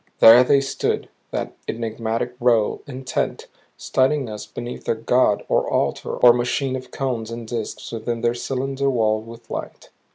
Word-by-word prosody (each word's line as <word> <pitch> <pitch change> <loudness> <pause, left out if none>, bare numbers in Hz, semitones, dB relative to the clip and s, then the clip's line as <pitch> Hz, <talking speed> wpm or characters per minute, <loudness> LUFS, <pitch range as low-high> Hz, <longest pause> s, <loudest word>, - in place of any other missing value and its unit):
There 115 +3 +9
they 140 +2 +4
stood 135 - -2 0.2
that - - -4
enigmatic 115 +1 -2
row, 120 -3 +2
intent, 130 -1 -3 0.3
studying 135 -1 +1
us 105 -1 -7
beneath 120 +1 -7
their - - +1
god 115 -2 +2
or - - +1
altar - - -1
or 120 -1 +7
machine 125 +2 0
of 130 -1 -7
cones 125 -5 -3
and 115 -1 -7
disks 115 -2 -5
within 115 0 -3
their 120 +1 +2
cylinder 135 +2 -2
walled 110 -3 +1
with 115 0 -12
light. - - -6
120 Hz, 155 wpm, -22 LUFS, 115-130 Hz, 0.3 s, There